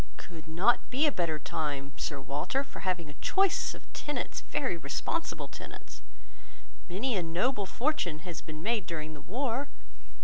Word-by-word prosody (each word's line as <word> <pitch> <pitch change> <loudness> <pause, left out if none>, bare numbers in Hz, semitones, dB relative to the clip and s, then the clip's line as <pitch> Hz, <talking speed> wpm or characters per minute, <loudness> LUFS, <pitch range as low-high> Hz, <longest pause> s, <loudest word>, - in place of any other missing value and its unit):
Could 165 -3 -9
not 180 +9 +4
be 270 +5 +4
a 300 - +5
better 170 - +1
time, 145 -2 -2
Sir 140 0 -2
Walter, 145 - 0
for - - -9
having 180 -4 0
a 145 - -8
choice 390 -2 +4
of - - -11
tenants, 295 - -2
very 265 -10 0
responsible 160 - -1
tenants. - - -9 0.9
Many 220 +7 +1
a 185 - +3
noble 195 +6 +1
fortune 185 - +1
has 170 -3 -4
been 155 0 -7
made 220 -4 +2
during 155 -2 -3
the 150 - -8
war. 255 +5 0
175 Hz, 160 wpm, -32 LUFS, 155-255 Hz, 0.9 s, a